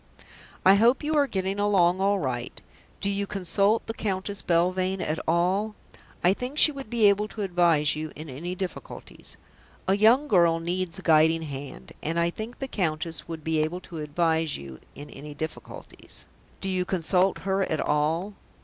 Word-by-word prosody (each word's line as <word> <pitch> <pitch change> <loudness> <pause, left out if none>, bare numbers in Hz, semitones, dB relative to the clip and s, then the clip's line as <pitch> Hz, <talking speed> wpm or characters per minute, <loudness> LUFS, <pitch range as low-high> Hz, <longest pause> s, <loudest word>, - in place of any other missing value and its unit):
"I 190 - +8
hope 235 +8 +4
you 310 +1 0
are 285 -2 +4
getting 195 -2 -2
along 190 -3 +3
all 200 +1 +3
right. 125 -8 -4 0.4
Do 200 - 0
you 200 0 -2
consult 200 +3 +1
the 225 - -4
Countess 200 -2 -2
Belvane 185 +2 +1
at 160 -2 -2
all? 185 +6 +1 0.5
I 180 +2 +5
think 250 +7 -6
she 310 - +7
would 275 -5 -8
be 225 -3 +4
able 205 +1 +3
to 215 -1 -5
advise 170 -5 +3
you 155 0 -5
in 155 +1 -8
any 165 +7 -5
difficulties. 185 -1 -7 0.5
A 190 - +4
young 230 +8 +4
girl 170 - +4
needs 175 +1 -2
a 190 - -9
guiding 160 0 +4
hand, 135 - -8
and 165 +2 -1
I 170 0 +1
think 220 +6 -7
the 270 - -4
Countess 160 - -3
would 165 -2 -7
be 160 0 0
able 160 +4 -2
to 170 -3 -8
advise 160 0 0
you 70 -2 -10 0.2
in 145 - -9
any 145 +1 -9
difficulties. 160 +1 -9 0.4
Do 195 - -3
you 185 -1 0
consult 185 +1 +1
her 195 0 +1
at 160 -5 -1
all? 160 +7 0
180 Hz, 175 wpm, -26 LUFS, 160-200 Hz, 0.5 s, I